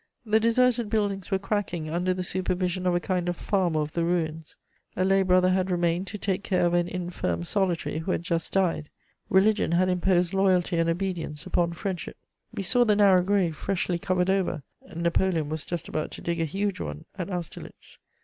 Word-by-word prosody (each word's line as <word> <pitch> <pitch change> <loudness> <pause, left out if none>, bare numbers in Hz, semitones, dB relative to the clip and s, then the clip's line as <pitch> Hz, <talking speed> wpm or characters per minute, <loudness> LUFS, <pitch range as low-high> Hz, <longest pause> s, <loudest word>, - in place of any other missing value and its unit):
The 220 0 +3
deserted 235 0 +2
buildings 205 -3 -1
were 195 - +2
cracking 195 -5 -2
under 175 +3 0
the 185 0 -2
supervision 185 0 -1
of 180 - +2
a - - +2
kind 180 -1 -1
of 175 - -3
farmer 175 -6 0
of 150 0 -3
the 170 - 0
ruins. 160 -2 -2 0.4
A 185 - +1
lay 195 0 +4
brother 185 0 +4
had 185 0 +1
remained 175 +1 0
to 210 - -5
take 195 -1 -1
care 185 -3 +1
of 175 - +1
an 175 0 +2
infirm 175 - -3
solitary 175 - -1
who 160 - -6
had 170 - -1
just 170 -3 -2
died: 175 -5 0 0.4
religion 195 -2 +3
had 185 +2 +3
imposed 180 -1 +2
loyalty 185 -2 +2
and 165 0 +2
obedience 170 -3 -3
upon 175 -2 0
friendship. 180 0 -5 0.3
We 195 - -4
saw 245 +6 +4
the 215 -3 +3
narrow 195 -3 +5
grave 185 -3 +1
freshly 180 0 -1
covered 180 +1 +1
over: 180 -6 0 0.3
Napoleon 170 -2 +1
was 155 0 -3
just 170 -2 -4
about 155 - -3
to - - -8
dig 170 -1 -2
a - - +2
huge 195 +5 -2
one 75 -1 -6
at 180 - -3
Austerlitz. 175 -4 -7
180 Hz, 195 wpm, -26 LUFS, 170-195 Hz, 0.4 s, narrow